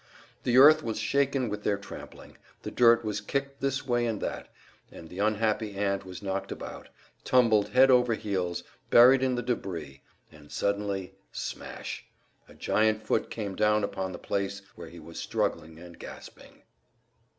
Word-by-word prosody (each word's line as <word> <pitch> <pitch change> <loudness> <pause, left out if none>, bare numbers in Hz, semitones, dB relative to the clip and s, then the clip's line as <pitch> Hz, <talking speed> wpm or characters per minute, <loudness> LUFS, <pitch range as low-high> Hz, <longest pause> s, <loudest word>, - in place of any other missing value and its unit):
The 125 0 +3
earth 155 +4 +8
was 115 -6 -3
shaken 135 +3 +1
with 105 -1 -4
their 100 - +1
trampling, 100 0 -11 0.2
the - - -5
dirt 115 -1 +5
was 105 -1 -2
kicked 140 +5 -3
this 135 -1 -1
way 120 -2 +1
and 110 -3 -2
that, - - -4 0.4
and 80 - -11
the 90 - -9
unhappy 110 0 0
ant 100 -1 -1
was 95 +2 -9
knocked 95 0 -3
about, - - -8 0.3
tumbled 115 -5 +3
head 130 +1 +6
over 125 -2 +4
heels, 95 -5 -2 0.3
buried 125 +3 +7
in 130 -1 +1
the 120 - -2
debris; 85 - -4 0.3
and 75 -2 -16
suddenly 100 -2 -2 0.2
Smash! - - -6 0.5
a - - -15
giant 110 0 +1
foot 110 - 0
came 105 -4 -4
down 105 +1 +2
upon 95 -1 -3
the 90 - -7
place 100 0 -3
where 85 -1 -9
he 85 - -13
was 85 +1 -10
struggling 80 0 -2
and 85 0 -13
gasping! - - -12
105 Hz, 160 wpm, -28 LUFS, 95-120 Hz, 0.5 s, earth